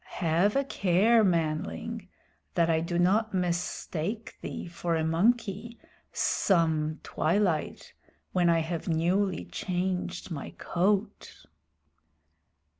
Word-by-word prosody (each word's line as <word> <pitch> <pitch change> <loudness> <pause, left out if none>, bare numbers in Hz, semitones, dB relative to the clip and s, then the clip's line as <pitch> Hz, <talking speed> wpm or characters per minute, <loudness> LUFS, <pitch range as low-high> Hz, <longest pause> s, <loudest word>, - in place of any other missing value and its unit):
Have 175 +4 +2
a 275 - +3
care, 215 0 +3
manling, 180 +5 -1 0.5
that 170 -1 +3
I 160 - +2
do 170 +1 -2
not 200 +4 +2
mistake 180 +3 -2
thee - - -5
for 170 0 -2
a 160 - 0
monkey 215 +6 0 0.3
some 160 -4 +1
twilight 170 -2 0 0.4
when 175 -2 +3
I 165 -1 +3
have 165 0 -4
newly 180 +4 +1
changed 180 0 -3
my 150 -4 -6
coat." 195 +4 -1
180 Hz, 105 wpm, -28 LUFS, 165-205 Hz, 0.5 s, a